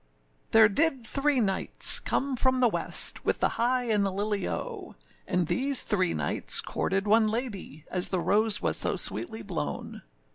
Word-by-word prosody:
] - - -41
THERE 220 -1 +6
did 265 +3 0
three 275 +3 0
Knights 195 -4 +3
come 275 0 -2
from 260 +1 0
the 250 - +3
west, - - +1
With - - -1
the - - +1
high 250 +2 -1
and 215 -4 0
the 195 - 0
lily 200 0 -3
oh! - - -7 0.3
And 180 -1 -1
these 265 - +3
three 185 -5 -1
Knights 75 -2 +1
courted 195 +1 -2
one 220 +1 +3
ladye, 215 - -5
As 180 -1 -1
the 185 - -2
rose 210 +4 +1
was - - 0
so - - 0
sweetly 225 -10 -1
blown. 175 -7 -6
215 Hz, 175 wpm, -26 LUFS, 195-250 Hz, 0.3 s, THERE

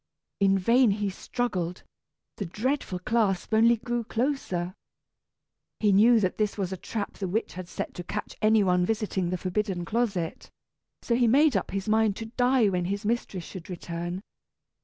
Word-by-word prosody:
In 195 -1 +4
vain 235 +6 +4
he 205 0 0
struggled; 185 -5 -3 0.5
the 200 - -3
dreadful 230 +1 -2
clasp 200 0 0
only 230 +2 +5
grew 240 +1 -2
closer. 225 -8 -2 1.1
He 210 -2 +3
knew 225 +4 +6
that 185 -1 -1
this 210 -1 0
was 190 -2 -2
a - - -2
trap 205 +3 -5
the 195 - -2
witch 215 +6 -2
had 180 -1 -7
set - - -5
to 175 - -6
catch - - -5
any 215 0 +5
one 180 -1 +3
visiting 195 -3 -1
the 185 - -1
forbidden 185 0 -2
closet, 200 -6 -2 0.5
so 235 - 0
he 240 0 +3
made 280 +3 +5
up 195 - 0
his 195 +1 -3
mind 215 -1 +3
to 225 - -6
die 250 -2 +4
when 180 -2 0
his 200 +3 -3
mistress 210 -5 -1
should 185 -1 -9
return. 175 +1 -5
205 Hz, 170 wpm, -27 LUFS, 185-230 Hz, 1.1 s, knew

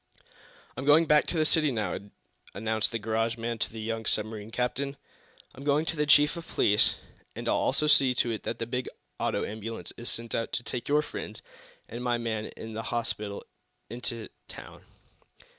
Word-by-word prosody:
"I'm 130 - -4
going 150 +3 +7
back 150 -1 +4
to 170 - -1
the 155 - +3
city, 155 -2 +4
now," 110 -4 -1 0.6
announced 110 +1 +1
the 115 - -1
garage 115 +1 0
man 115 0 -3
to - - -1
the 110 - -7
young 115 0 -3
submarine 110 0 0
captain. 135 +4 -2 0.6
"I'm 135 - -10
going 145 +2 +2
to 165 - -2
the 150 -1 0
chief 145 +2 +6
of 170 -1 -7
police, 105 +1 +3 0.4
and - - -5
I'll - - +3
also 150 - +2
see 135 -4 +5
to 120 - +2
it 110 - -3
that - - -4
a 115 - -1
big 125 +2 -2 0.3
auto - - 0
ambulance 110 +2 -6
is 120 - -4
sent 115 0 -3
out 115 - -1
to 120 - 0
take 120 +2 -4
your 150 +1 +4
friends - - -7 0.4
and 120 +2 -6
my 120 -1 +2
man 110 -2 -2
to 110 0 -7
the 110 - -3
hospital 105 -4 -3 0.5
in 120 +1 -6 0.5
town. - - -11
120 Hz, 190 wpm, -29 LUFS, 110-140 Hz, 0.6 s, going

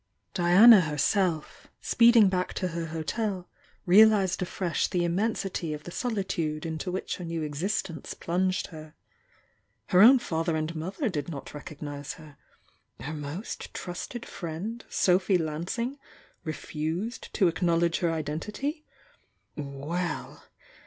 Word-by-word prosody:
Diana 195 +4 +8
herself, 160 +2 0
speeding 235 -3 +6
back 185 -1 -1
to 185 - -1
her 165 0 -4
hotel, 180 +4 -3 0.4
realised 200 -1 +5
afresh 180 -1 -1
the 180 -3 0
immensity 180 -3 -1
of 150 - -10
the 175 - -8
solitude 175 -9 -2
into 160 +3 -3
which 185 - -3
her 180 - -7
new 165 -1 -3
existence 160 +1 -3
plunged 185 +2 0
her. 155 -1 -10 0.9
Her 180 - +6
own 250 +5 +9
father 165 -7 -1
and 155 +1 -2
mother 185 - -3
did 150 -7 -3
not 145 -5 -7
recognise 145 -1 -7
her, 155 -3 -14 0.3
— - - -41
^her 150 +4 -5
most 150 +8 -6
trusted 185 +7 -6
friend, 190 +8 -6
Sophy 185 +1 +3
Lansing, 175 - -3 0.4
refused 160 +7 -4
to 195 - +4
acknowledge 170 0 +1
her 170 -2 +1
identity 205 - -3 0.4
— - - -45
well! 150 +5 -4
175 Hz, 125 wpm, -28 LUFS, 155-195 Hz, 0.9 s, own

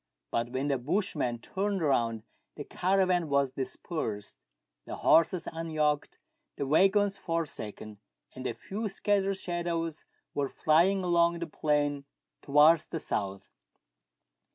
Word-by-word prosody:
But 115 +1 -1
when 130 +3 -2
the 140 -3 +1
bushman 145 - -1
turned 195 - -2
round 115 -6 +1 0.3
the 145 - -6
caravan 185 -1 +1
was 140 -2 +2
dispersed, 130 - -4 0.5
the - - -5
horses 165 +2 +3
unyoked, 155 -3 -1 0.4
the 140 - -3
waggons 195 +6 +3
forsaken, 110 - -4 0.3
and 130 0 -5
a 115 - -3
few 210 - -4
scattered 195 -1 0
shadows 170 -3 -3 0.3
were 140 -2 -1
.flying 180 +5 +3
along 170 -1 +3
the 170 - -3
plain 145 -2 0 0.4
towards 150 +3 +5
the - - -4
south. 100 -9 -4
160 Hz, 120 wpm, -29 LUFS, 140-180 Hz, 0.5 s, towards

